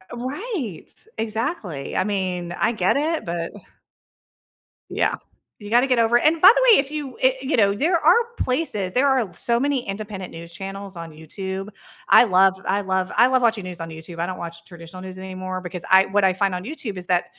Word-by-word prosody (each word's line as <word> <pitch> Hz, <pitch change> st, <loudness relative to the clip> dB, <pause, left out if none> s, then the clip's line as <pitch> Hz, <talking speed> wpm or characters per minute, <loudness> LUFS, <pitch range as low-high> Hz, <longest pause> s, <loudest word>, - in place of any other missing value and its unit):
Eh 185 Hz, -, -24 dB
right. 265 Hz, -, -5 dB, 0.3 s
Exactly. 220 Hz, -, -3 dB
I -, -, +2 dB
mean, 185 Hz, -4 st, -2 dB
I 235 Hz, -, 0 dB
get 190 Hz, +2 st, +1 dB
it, 315 Hz, +3 st, -1 dB
but 170 Hz, -1 st, -4 dB, 1.4 s
Yeah. -, -, 0 dB, 0.4 s
You 205 Hz, 0 st, -9 dB
gotta 245 Hz, +3 st, +4 dB
get 255 Hz, -2 st, +2 dB
over 230 Hz, +1 st, +4 dB
and 310 Hz, +6 st, +3 dB
by 380 Hz, -, +10 dB
the -, -, +2 dB
way, 435 Hz, -, +8 dB
if 275 Hz, +1 st, -1 dB
you 290 Hz, -4 st, -5 dB
i 260 Hz, 0 st, +4 dB
you 265 Hz, 0 st, 0 dB
know, 200 Hz, -2 st, +3 dB
there 335 Hz, -, +1 dB
are -, -, +5 dB, 0.2 s
places, 230 Hz, -, -1 dB
there 275 Hz, +3 st, +3 dB
are 250 Hz, -9 st, +1 dB
so 235 Hz, 0 st, +1 dB
many 275 Hz, -1 st, -1 dB
independent 195 Hz, -2 st, -6 dB
news 170 Hz, +1 st, -10 dB
channels 195 Hz, +1 st, -7 dB
on 165 Hz, -1 st, -7 dB
YouTube. 190 Hz, +6 st, -6 dB, 0.4 s
I -, -, +8 dB
love 190 Hz, -2 st, +4 dB
I 200 Hz, +1 st, 0 dB
love 190 Hz, -1 st, -1 dB
I 245 Hz, -, +6 dB
love 255 Hz, -1 st, +2 dB
watching 220 Hz, -4 st, +1 dB
news 180 Hz, -2 st, -7 dB
on 165 Hz, -, -5 dB
YouTube, 160 Hz, +1 st, -9 dB
I 170 Hz, -, 0 dB
don't 185 Hz, -, -5 dB
watch 170 Hz, 0 st, -8 dB
traditional 175 Hz, +1 st, -11 dB
news 185 Hz, 0 st, -8 dB
anymore 185 Hz, 0 st, -5 dB
because 180 Hz, -1 st, -6 dB
I 190 Hz, +1 st, +6 dB
what 205 Hz, +1 st, +1 dB
I 190 Hz, -, +4 dB
find 190 Hz, 0 st, 0 dB
on 180 Hz, -, -4 dB
YouTube 240 Hz, -6 st, -6 dB
is 180 Hz, -1 st, -6 dB
that 180 Hz, -1 st, +2 dB
195 Hz, 205 wpm, -22 LUFS, 180-250 Hz, 1.4 s, by